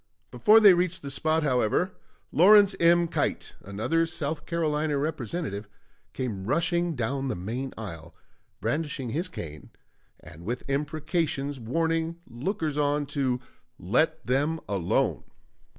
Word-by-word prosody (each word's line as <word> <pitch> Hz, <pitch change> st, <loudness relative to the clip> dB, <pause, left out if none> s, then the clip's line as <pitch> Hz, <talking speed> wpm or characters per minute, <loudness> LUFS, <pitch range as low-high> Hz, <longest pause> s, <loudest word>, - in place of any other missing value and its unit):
Before 215 Hz, +1 st, +6 dB
they 205 Hz, -4 st, +8 dB
reached 180 Hz, 0 st, 0 dB
the 140 Hz, -, -5 dB
spot, 155 Hz, +3 st, +1 dB
however, 130 Hz, -, +1 dB, 0.4 s
Lawrence 200 Hz, +3 st, +6 dB
M. 170 Hz, 0 st, +5 dB
Keitt, -, -, -2 dB
another 110 Hz, -, 0 dB
South 155 Hz, -2 st, -3 dB
Carolina 155 Hz, -3 st, 0 dB
Representative, 140 Hz, -, -3 dB, 0.4 s
came 110 Hz, -8 st, -4 dB
rushing 170 Hz, -, +1 dB
down 135 Hz, +3 st, -2 dB
the 130 Hz, -, -1 dB
main 120 Hz, +9 st, -4 dB
aisle, 85 Hz, -7 st, -8 dB, 0.5 s
brandishing 145 Hz, -6 st, -2 dB
his 170 Hz, -, -2 dB
cane, 75 Hz, -, -8 dB, 0.5 s
and 80 Hz, +3 st, -13 dB
with 120 Hz, +6 st, -4 dB
imprecations 145 Hz, 0 st, -1 dB
warning 165 Hz, +7 st, -1 dB
lookers 155 Hz, -, -3 dB
on 145 Hz, 0 st, +1 dB
to 135 Hz, -3 st, -1 dB, 0.4 s
"let 155 Hz, -, +1 dB
them 145 Hz, +6 st, +1 dB
alone." 95 Hz, -4 st, 0 dB
145 Hz, 120 wpm, -27 LUFS, 125-165 Hz, 0.5 s, they